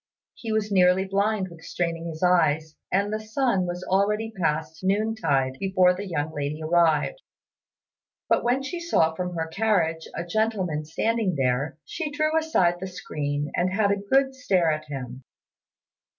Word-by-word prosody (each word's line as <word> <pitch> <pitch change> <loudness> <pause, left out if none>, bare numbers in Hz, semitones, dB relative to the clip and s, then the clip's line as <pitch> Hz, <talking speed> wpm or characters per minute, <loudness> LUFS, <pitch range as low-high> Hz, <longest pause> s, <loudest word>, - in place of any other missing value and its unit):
He 225 - -6
was 215 -1 0
nearly 185 0 +4
blind 200 0 0
with 165 -1 -13
straining 170 0 -3
his 160 +1 -6
eyes, 160 -3 +2 0.2
and 200 +3 +1
the 215 - -1
sun 215 -4 0
was 175 +1 -4
already 210 +4 +1
past 160 -3 -1
noontide 190 -10 +1
before 185 -2 +3
the 200 +2 -6
young 155 -3 -2
lady 145 +1 -3
arrived; 170 - +2 1.1
but - - +2
when 250 +3 +1
she 345 +5 -4
saw 165 - +2
from 180 +1 -4
her 160 -1 -1
carriage 165 -3 0
a - - -3
gentleman 185 -6 -1
standing 215 +4 0
there, 135 +2 0
she 320 - -4
drew 310 +2 0
aside 185 - +2
the 190 - -4
screen 145 -5 -3
and 185 +1 +1
had 205 -1 +3
a - - +3
good 265 +7 +2
stare 185 - +2
at 155 0 -3
him. 130 -2 -7
180 Hz, 160 wpm, -25 LUFS, 160-215 Hz, 1.1 s, nearly